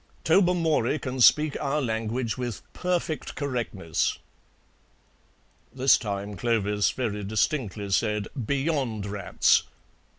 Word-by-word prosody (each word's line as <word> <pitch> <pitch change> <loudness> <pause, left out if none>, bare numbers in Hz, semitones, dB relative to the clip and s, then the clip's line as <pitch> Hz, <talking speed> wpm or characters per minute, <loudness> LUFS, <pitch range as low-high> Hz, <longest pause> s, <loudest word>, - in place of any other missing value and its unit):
Tobermory 165 -3 +2
can 130 -3 -4
speak 150 +4 +5
our 145 +1 0
language 115 -1 -2
with 125 -4 -5
perfect 175 -3 -2
correctness." 115 - -2 1.5
This 130 0 +4
time 100 -1 -4
Clovis 105 -1 +1
very 105 -5 -3
distinctly 105 -1 -1
said, 105 +2 +1 0.2
"Beyond 135 -7 -1
rats!" 100 -2 +2
120 Hz, 95 wpm, -26 LUFS, 105-145 Hz, 1.5 s, speak